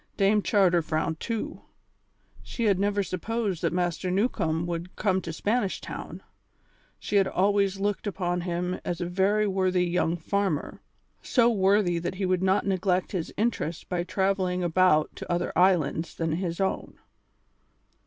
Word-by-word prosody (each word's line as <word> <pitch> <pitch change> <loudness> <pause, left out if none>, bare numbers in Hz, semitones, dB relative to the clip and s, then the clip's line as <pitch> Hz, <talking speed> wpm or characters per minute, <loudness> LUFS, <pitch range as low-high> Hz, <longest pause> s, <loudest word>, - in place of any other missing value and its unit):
Dame 205 +1 +3
Charter 185 -5 +3
frowned 160 0 -2
too. 230 -2 -4 0.8
She 235 - -5
had 200 -4 +3
never 205 0 +1
supposed 195 +1 -2
that 170 - +1
Master 175 +1 -1
Newcombe 170 -5 0
would 170 +1 -5
come 190 -3 +1
to 165 - -5
Spanish 205 +4 -1
Town; - - -8 0.7
she 205 - -1
had 195 -1 +4
always 195 0 +1
looked 205 +1 -1
upon 180 -3 -1
him 180 +1 -2
as 175 -1 -3
a 175 - -2
very 195 +4 +2
worthy 185 -2 +1
young 175 -1 0
farmer; 190 -2 -2 0.4
so 240 -2 +3
worthy 195 -4 +2
that 170 +2 -4
he 190 0 -2
would 185 -1 +1
not 190 +1 +2
neglect 185 -1 0
his 175 -5 -3
interest 200 -7 -2
by 175 -1 -1
travelling 185 -1 0
about 175 -3 +3
to - - -6
other 175 0 -1
islands 170 -3 +2
than 165 -1 -1
his 170 +1 -2
own. 190 -1 -2
185 Hz, 155 wpm, -27 LUFS, 175-200 Hz, 0.8 s, had